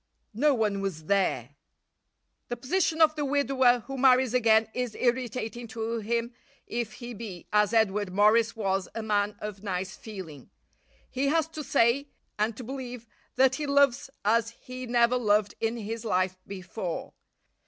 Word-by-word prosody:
No 280 +6 +3
one 210 -4 0
was 170 -6 -4
there. 160 - +1 1.0
The 240 - -4
position 320 +5 +2
of 310 -1 +5
the 300 - -2
widower 265 -3 +3
who 270 +3 -7
marries 255 -2 +4
again 225 -3 +4
is 250 -3 -3
irritating 240 -1 -1
to 225 +1 -3
him 235 +2 -2 0.3
if 235 -2 -3
he 240 +2 -8
be, 200 -6 -8
as 210 -1 +4
Edward 210 -3 +1
Morris 215 +4 +4
was, 195 -3 -1
a 225 - -3
man 205 -1 0
of 210 -2 -7
nice 190 -1 -3
feeling. 180 - -9 0.6
He 270 +2 -1
has 320 +1 +2
to 310 -1 -6
say, 275 0 +2 0.3
and 215 +1 0
to 255 - -7
believe, 250 -1 -7 0.3
that 265 0 +4
he 295 +2 -3
loves 280 -3 +3 0.2
as 230 +1 +3
he 255 +2 -9
never 240 +1 +3
loved 210 -3 +2
in 225 +1 -1
his 225 +1 -5
life 185 -3 0
before. 185 -2 -5
230 Hz, 155 wpm, -28 LUFS, 205-255 Hz, 1.0 s, of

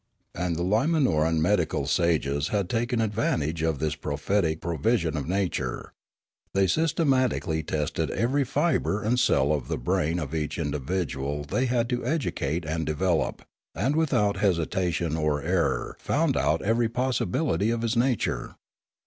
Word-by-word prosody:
And 90 -1 -2
the 85 - -2
Limanoran 105 - +2
medical 90 +1 +1
sages 75 -4 +1
had 100 -4 -1
taken 120 +1 0
ad 110 -2 0
vantage 80 -7 0
of 80 -2 0
this 75 +1 -1
prophetic 80 +3 -1
provision 85 0 0
of 75 -2 -3
nature. 95 -1 -2 0.6
They 95 0 +4
systematically 130 - +1
tested 75 -2 -2
every 135 +5 +1
fibre 125 -6 0
and 120 +4 +1
cell 75 - +3
of 70 -5 -2
the - - -2
brain 75 +7 0
of 75 -4 -4
each 75 -2 -2
individual 75 -2 -2
they 125 - 0
had 120 -1 +1
to 125 -1 -1
educate 90 - -1
and 80 +1 -2
develop, 80 +2 0 0.3
and 130 +9 0
without 120 -11 +2
hesitation 85 -3 0
or 75 -2 0
error 90 0 0
found - - +1
out - - +1
every 115 +2 +2
pos 125 +2 0
sibility 115 - 0
of 115 0 -2
his 115 +1 0
nature. 120 0 0
90 Hz, 150 wpm, -26 LUFS, 80-115 Hz, 0.6 s, They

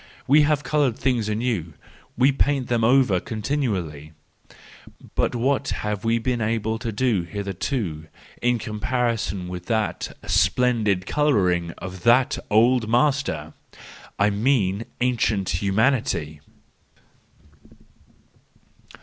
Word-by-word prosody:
—We 145 +3 +5
have 150 -1 +2
coloured 145 -7 +1
things 120 -5 0
anew, 105 -8 -2 0.4
we 130 +3 +5
paint 135 -1 0
them 120 -2 +1
over 120 -5 +4
continually,—but 95 - -5
what 135 +3 0 0.2
have 105 -1 -2
we 115 +1 +2
been 120 +1 -1
able 110 0 -1
to 115 -1 -3
do 110 -3 +1
hitherto 95 - -4 0.3
in 120 0 +2
comparison 115 -3 -2
with 90 0 -7
the 110 -2 0 0.3
splendid 105 -3 +2
colouring 95 - +1
of 90 0 -8
that 125 +6 +3
old 115 +1 +3
master 120 - 0 0.6
!—I 100 +1 +3
mean 105 -2 +1 0.2
ancient 110 -6 +1
humanity. 100 - 0
115 Hz, 100 wpm, -23 LUFS, 95-125 Hz, 0.6 s, We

